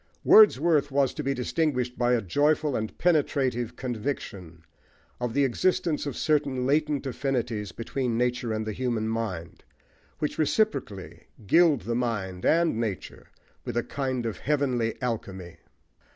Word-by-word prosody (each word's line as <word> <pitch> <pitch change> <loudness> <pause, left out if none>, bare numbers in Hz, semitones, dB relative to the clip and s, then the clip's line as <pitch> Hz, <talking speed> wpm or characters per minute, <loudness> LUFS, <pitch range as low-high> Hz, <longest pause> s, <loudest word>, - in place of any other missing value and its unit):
Wordsworth 160 -8 +6
was 140 -2 +1
to - - -4
be 135 0 -1
distinguished 125 -1 -1
by 120 -1 +2
a 115 -3 +1
joyful 145 - +1
and 110 0 -4
penetrative 135 -8 +1
conviction 105 - -5 0.6
of 125 -1 -3
the 140 - +3
existence 155 +3 0
of 140 - -4
certain 140 -5 0
latent 150 0 +1
affinities 120 -6 -2
between 120 0 -3
nature 125 0 0
and 110 0 -2
the 110 - -3
human 115 -2 -1
mind, 110 -7 -4 0.5
which 150 0 -3
reciprocally 155 - -1 0.2
gild 160 - +4
the 115 - -3
mind 105 -7 -2
and 165 -7 +2
nature 110 -5 -5 0.4
with - - -4
a 120 - +1
kind 130 -3 -3
of 115 - -4
"heavenly 130 -6 0
alchemy." 95 -7 -4
125 Hz, 135 wpm, -26 LUFS, 115-145 Hz, 0.6 s, Wordsworth